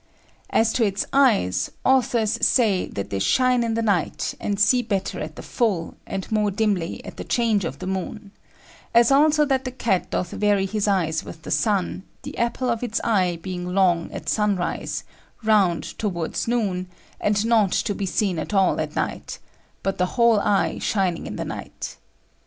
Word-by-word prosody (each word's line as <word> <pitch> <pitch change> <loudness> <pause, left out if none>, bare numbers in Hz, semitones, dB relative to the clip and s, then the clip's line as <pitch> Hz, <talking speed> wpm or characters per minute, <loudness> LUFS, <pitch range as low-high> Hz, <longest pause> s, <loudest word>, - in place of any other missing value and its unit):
As 225 0 +2
to 245 - +2
its 200 -2 0
Eyes, 205 - +3 0.2
Authors 240 -4 +2
say 215 -7 +3
that 100 - -6
they 100 - -1
shine 250 - +3
in 225 -1 -1
the 230 - 0
Night, 200 -7 0
and 200 -1 -2
see 245 +4 +4
better 200 -5 -2
at 155 0 -6
the - - -9
full, 200 -9 -1
and 195 +1 -5
more 210 -1 +2
dimly 200 -4 -1
at - - -9
the - - -5
change 225 -6 +1
of - - -4
the 185 - -7
moon; 190 +2 -4 0.6
as 235 +2 +6
also 300 +2 +5
that 265 -2 +1
the 255 - -3
Cat 230 -7 -1
doth 180 - -2
vary 205 -2 +2
his 210 +1 -1
Eyes 165 -6 +1
with 160 - -10
the - - -7
Sun, 195 -4 0 0.2
the 285 +1 -7
Apple 235 +1 0
of 230 - -2
its 235 -2 -1
Eye 185 -6 +1
being 180 -1 -4
long 175 -3 +2
at - - -8
Sun 210 -2 +2
rise, 175 -1 -3 0.4
round 200 -6 +3 0.2
towards 175 -5 -2
Noon, 200 -6 0 0.3
and 205 +1 +1
not 220 -5 +3
to 205 - 0
be 195 0 -3
seen 185 -3 0
at 180 +6 -4
all 190 -1 +3
at - - -5
night, - - -3 0.5
but 195 -1 -2
the 180 - +2
whole 235 -3 +5
Eye 200 -1 +1
shining 190 -5 -1
in - - -6
the - - -4
night. - - -7
205 Hz, 185 wpm, -23 LUFS, 185-230 Hz, 0.6 s, as